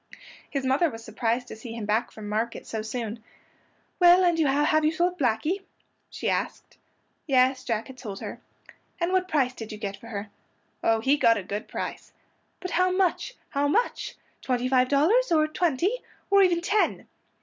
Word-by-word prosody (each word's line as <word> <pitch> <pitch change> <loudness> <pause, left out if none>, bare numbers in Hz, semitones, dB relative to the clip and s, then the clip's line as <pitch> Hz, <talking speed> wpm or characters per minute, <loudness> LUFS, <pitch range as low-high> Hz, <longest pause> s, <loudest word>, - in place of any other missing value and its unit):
His 275 -2 -2
mother 275 +6 +3
was 225 -2 -9
surprised 230 +3 -1
to - - -7
see 225 +1 -8
him 230 -2 -5
back 215 +3 +1
from 215 -1 -9
market 220 +3 -2
so 220 - -4
soon. 220 0 -5 0.8
"Well, 355 +1 +7
and 350 -2 +4
have 295 +1 +3
you 305 - +3
sold 350 +2 0
Blackey?" 290 - 0 0.5
she - - -5
asked. - - -3 0.5
Yes, 260 -1 +3
Jack 230 -4 -1
had 265 -1 -12
sold 205 -6 -6
her. - - -7 0.6
"And 340 +1 0
what 370 -1 +2
price 270 -7 +1
did 225 -2 -8
you 215 - -6
get 200 -1 -4
for 230 - -13
her?" 205 -2 -6 0.5
Oh, 225 0 +3
he 275 +5 +3
got 230 -5 +4
a 200 - -4
good 205 +3 -5
price. - - -6 0.5
"But 365 - -5
how 365 +1 +3
much? 375 +6 0
How 285 +1 +1
much? 460 +12 0 0.3
Twenty 250 -1 0
five 255 -1 +3
dollars? 360 - +3
Or 310 -2 +4
twenty? 350 - 0 0.3
Or 400 0 +7
even 350 -3 +3
ten?" 415 +4 +1
265 Hz, 180 wpm, -26 LUFS, 225-345 Hz, 0.8 s, Well